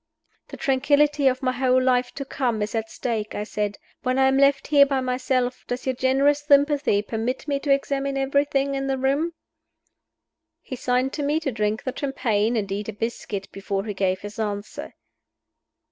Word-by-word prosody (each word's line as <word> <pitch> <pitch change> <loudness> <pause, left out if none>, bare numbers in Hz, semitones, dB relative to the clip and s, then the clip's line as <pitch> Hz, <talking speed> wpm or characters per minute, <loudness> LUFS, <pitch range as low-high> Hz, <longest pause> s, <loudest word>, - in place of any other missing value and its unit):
"The - - -9
tranquillity 285 0 +2
of 255 0 +1
my 255 - +2
whole 255 0 +2
life 255 -1 +2
to 275 - -5
come 240 -5 -1
is 210 - -4
at 225 -1 -2
stake," 220 -4 -3
I 205 - -2
said. 210 -1 -3 0.2
"When 255 0 0
I 265 0 +5
am 265 - +2
left 275 0 +4
here 290 -2 +6
by 270 -1 0
myself, 255 0 -1
does 245 +1 -4
your 260 - +1
generous 270 +3 +2
sympathy 285 -6 +3
permit 230 +6 -3
me 280 -1 0
to 280 0 -1
examine 275 0 0
everything 275 0 +1
in 270 0 -2
the 270 -1 0
room?" 280 +6 0 1.3
He 260 - -7
signed 250 +1 0
to 300 - -3
me 290 +2 +1
to 275 - -1
drink 215 -1 -1
the 255 - -3
champagne 235 -5 0
and 200 -3 -2
eat 205 +2 -3
a - - -4
biscuit 210 -2 -4
before 195 0 -3
he 210 - -3
gave 190 -1 0
his 205 +2 -8
answer. 205 -1 -4
255 Hz, 185 wpm, -24 LUFS, 220-275 Hz, 1.3 s, here